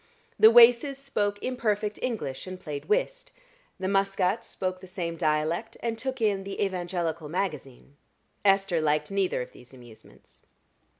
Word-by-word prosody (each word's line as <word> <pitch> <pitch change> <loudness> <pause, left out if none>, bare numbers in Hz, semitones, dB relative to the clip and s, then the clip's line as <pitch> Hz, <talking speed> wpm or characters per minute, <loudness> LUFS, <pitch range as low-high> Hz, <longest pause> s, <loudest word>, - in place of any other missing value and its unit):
The 220 - +9
Waces 240 +4 +6
spoke 210 -7 -1
imperfect 215 -4 -1
English 205 - -4
and 185 0 -7
played 150 -4 -6
whist; - - -1 0.5
the 190 - -2
Muscats 195 +1 +1
spoke 185 -1 -4
the 185 - -11
same 175 -2 -4
dialect 155 +6 -1
and 230 -1 -2
took 260 +3 -4
in 205 -3 +1
the 195 0 -7
"Evangelical 175 -4 -3
Magazine." 150 -6 -5 0.5
Esther 195 -4 +3
liked 150 +2 0
neither 195 -9 0
of - - -13
these 125 +2 -16
amusements. 120 -3 -16
195 Hz, 140 wpm, -27 LUFS, 165-220 Hz, 0.5 s, The